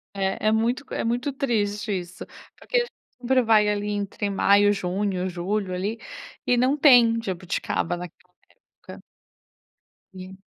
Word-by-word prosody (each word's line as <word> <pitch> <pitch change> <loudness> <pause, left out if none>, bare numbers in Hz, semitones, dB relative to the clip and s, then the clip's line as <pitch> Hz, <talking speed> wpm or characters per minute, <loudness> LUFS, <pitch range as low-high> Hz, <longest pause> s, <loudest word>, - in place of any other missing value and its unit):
É, 195 +2 -1
é - - +3
muito 235 +5 0
é - - -2
muito 245 +5 -1
triste 215 -6 -1
isso, 175 0 -9 0.3
porque - - -3
a - - +5
gente 480 - -4 0.3
sempre 255 +1 +2
vai, 220 -2 +4
ali, 210 0 -1
entre 205 0 -3
maio, 200 +1 +4
junho, 190 0 -2
julho 185 +2 -3
ali. 205 +5 -3 0.5
E 245 - +3
não 260 +4 +2
tem 245 -6 +6
jabuticaba 175 -2 -3
naquela 180 +1 -11 0.5
época. - - -10 1.1
Sim. 190 +1 -11
205 Hz, 140 wpm, -24 LUFS, 190-235 Hz, 1.1 s, tem